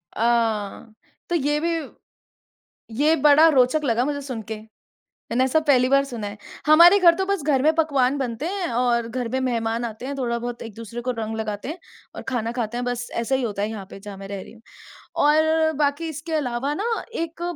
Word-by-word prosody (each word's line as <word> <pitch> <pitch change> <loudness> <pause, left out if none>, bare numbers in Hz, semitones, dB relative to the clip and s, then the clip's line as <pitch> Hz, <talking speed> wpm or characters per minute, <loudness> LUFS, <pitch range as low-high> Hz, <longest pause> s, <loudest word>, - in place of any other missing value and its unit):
अ - - -7
अ, 225 -2 0 0.4
तो 345 - +1
ये 295 -1 +1
भी 335 +2 0 1.3
ये 310 +2 +4
बड़ा 300 +2 +7
रोचक 270 +2 +3
लगा 240 -2 +1
मुझे 285 0 -2
सुनके। 225 -5 -6 0.8
मैंने 250 +3 +2
ऐसा 265 +5 +2
पहली 255 -3 +4
बार 275 +1 +4
सुना 240 -6 -6
है। 205 +1 -7 0.3
हमारे 340 +6 +8
घर 345 -3 +6
तो 380 +2 -1
बस 395 -5 -1
घर 275 -3 +2
में 310 +2 +4
पकवान 280 -5 +2
बनते 250 +1 -3
हैं, 375 0 -2
और 235 -1 +1
घर 245 0 -3
में 260 - -1
मेहमान 230 -2 -1
आते 230 +2 -6
हैं, 280 - -4
थोड़ा-बहुत 240 -1 -3
एक-दूसरे 230 +1 -8
को 250 +1 -2
रंग 220 0 -3
लगाते 215 0 -4
हैं, 330 +4 -5 0.4
और - - -7
खाना 235 -3 -1
खाते 240 -2 -3
हैं। 245 - -2
बस 245 0 -3
ऐसा 250 +3 0
ही 265 - 0
होता 205 -4 -2
है 210 - 0
यहाँ 210 -3 -6
पे, - - -9
जहाँ 205 0 -9
मैं 195 0 -9
रह 200 -1 -5
रही - - -13
हूँ। 225 -1 -18 0.6
और 315 +1 +3
बाकी 295 +3 0
इसके 315 +2 -7
अलावा 275 -1 -1
ना, 400 - -3 0.3
एक 335 -2 -4
255 Hz, 205 wpm, -23 LUFS, 230-300 Hz, 1.3 s, हमारे